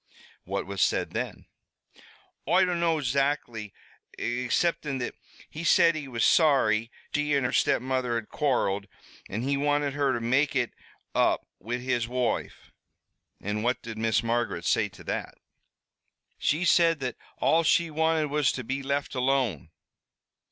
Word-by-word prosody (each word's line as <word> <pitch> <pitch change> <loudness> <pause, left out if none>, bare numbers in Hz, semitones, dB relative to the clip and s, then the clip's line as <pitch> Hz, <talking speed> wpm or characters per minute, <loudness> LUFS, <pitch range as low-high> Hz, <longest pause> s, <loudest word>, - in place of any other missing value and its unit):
"What - - -3
was 100 -1 -4
said - - +1
then?" - - -4 1.0
"Oi 185 +1 +5
dunno 170 -2 +1
exactly, 135 -6 -1 0.5
exceptin' 130 +4 0
that 120 -1 -3 0.3
he 155 - -7
said 170 0 +5
he 150 -3 -5
was 115 -4 -2
sorry 115 -9 +4 0.2
she 150 -1 +1
an' 140 - +1
her 125 - 0
stepmother 130 -1 +1
had 115 -2 -3
quarreled, 105 -9 0 0.4
an' 110 +4 -3
he 140 +1 0
wanted 145 0 +1
her 140 -1 +1
to 120 - -1
make 130 +5 +1
it 125 -3 0 0.4
up - - +2
wid 120 +5 -4
his 125 -2 0
woife." 125 0 -2 0.7
"And 105 +2 -3
what 125 +2 0
did 110 -1 -7
Miss 110 0 +1
Margaret 115 -7 -1
say - - +2
to - - -14
that?" - - -4 1.0
"She 160 +5 +1
said 165 -2 +4
that 125 -2 -2 0.2
all 165 - +3
she 165 0 +2
wanted 160 -1 +1
was 150 -2 +2
to 130 - -4
be 130 +4 -3
left 140 +1 -2
alone." 125 - 0
130 Hz, 145 wpm, -27 LUFS, 120-150 Hz, 1.0 s, Oi